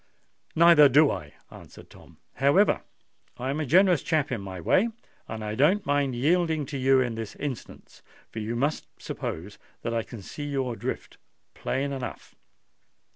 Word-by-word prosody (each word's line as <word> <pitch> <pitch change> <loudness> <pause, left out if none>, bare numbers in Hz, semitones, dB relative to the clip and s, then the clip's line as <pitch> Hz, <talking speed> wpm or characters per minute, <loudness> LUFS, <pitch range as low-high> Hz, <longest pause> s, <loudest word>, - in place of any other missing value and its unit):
"Neither 165 -3 +7
do 145 +3 +5
I," 75 -2 -7 0.2
answered - - -14
Tom. - - -17 0.2
"However, 145 +10 +3 0.6
I 130 +2 -2
am 145 - -3
a 155 - -2
generous 180 +2 +5
chap 155 -4 0
in 115 -5 -2
my 95 -2 -7
way, 195 - +2 0.4
and 110 -1 -6
I 105 0 -3
don't 165 - +3
mind 140 -3 +1
yielding 160 +3 +1
to - - -1
you 135 +1 +4
in 125 -2 0
this 115 -2 -6
instance; 140 -5 -7 0.3
for 115 - -6
you 110 +2 -3
must 145 +6 -1
suppose 95 +6 -6 0.2
that 115 - -2
I 115 - +1
can 110 -2 -10
see 145 +9 -7
your 135 -4 -2
drift - - -5 0.4
plain 140 +1 -2
enough. 130 -2 -6
135 Hz, 165 wpm, -26 LUFS, 115-155 Hz, 0.6 s, Neither